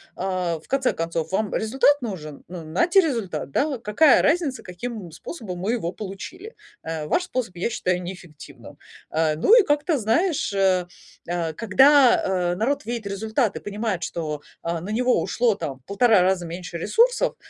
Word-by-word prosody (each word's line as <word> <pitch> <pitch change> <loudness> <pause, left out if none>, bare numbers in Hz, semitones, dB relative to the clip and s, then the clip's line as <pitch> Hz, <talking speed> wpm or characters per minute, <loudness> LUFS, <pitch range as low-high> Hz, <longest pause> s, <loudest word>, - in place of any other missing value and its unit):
А, 180 -3 -2
в - - -21
конце 265 -1 +1
концов, 165 0 -3
вам 200 +1 -1
результат 270 +6 +2
нужен? 160 - -6
Ну, 175 -1 -8
нате 340 - +3
результат, 215 - -1
да. 285 - +1
Вот 265 -6 -5
какая 270 +9 +5
разница, 300 -4 +1
каким 190 0 -7
способом 185 - -7
мы 200 +6 -1
его 195 -8 -2
получили? 285 - -8 0.3
Э, 160 -1 -4
ваш 350 - +1
способ 250 - -4
я 175 +6 -1
считаю 180 -6 -1
неэффективным. 175 -4 -11 0.3
Э, 155 -1 +1
ну 165 - +3
и - - +5
как-то, 295 0 +1
знаешь, 290 - +1
э, 190 -2 +2 0.7
когда, 255 - +5
э, 180 -2 0
народ 280 +9 -1
видит 235 -2 -4
результат 215 +3 -1
и - - -4
понимает, 205 -3 -3
что, 155 -4 -4 0.2
а, 170 0 -2
на 185 - -7
него 250 +3 +2
ушло 240 -2 +1
там 135 -8 -5
в 130 - -37
1,5 215 - +4
раза 180 -1 +1
меньше 170 +1 -6
ресурсов, 475 - +2
200 Hz, 170 wpm, -23 LUFS, 175-255 Hz, 0.7 s, какая